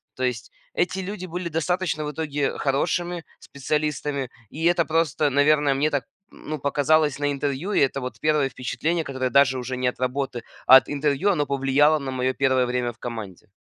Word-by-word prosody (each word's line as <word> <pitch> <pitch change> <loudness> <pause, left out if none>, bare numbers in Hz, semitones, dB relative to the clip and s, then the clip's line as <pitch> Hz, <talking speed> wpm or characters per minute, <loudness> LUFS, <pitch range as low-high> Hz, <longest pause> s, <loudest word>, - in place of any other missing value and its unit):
То 130 - -4
есть 120 -3 -2 0.2
эти 185 +2 0
люди 185 0 -5
были 175 0 -4
достаточно 165 -1 -1
в 150 - -3
итоге 145 -2 -2
хорошими 170 +5 -1
специалистами, 145 -1 -2 0.2
и 160 +2 -7
это 170 -1 +3
просто, 155 -2 +1
наверное, 145 0 +3
мне 145 +3 +1
так, 140 -5 -2 0.3
ну, 155 0 -6
показалось 145 +1 +2
на 145 0 0
интервью. 140 +8 -2
И - - +3
это 135 0 +2
вот 125 0 -6
1 150 -3 +2
впечатление, 150 +7 -2
которое, 130 -3 -2
даже 130 0 +4
уже 130 +1 -4
нет 125 -1 -1
работы, 130 -2 -2 0.2
а 130 - +11
от - - +1
интервью, 145 +7 +1
оно 150 -5 0
повлияло 140 +3 +3
на 135 -1 -5
мое 130 0 0
1 130 -2 +2
время 125 -1 -1
в - - -29
команде. 110 -5 -7
140 Hz, 180 wpm, -24 LUFS, 130-155 Hz, 0.3 s, а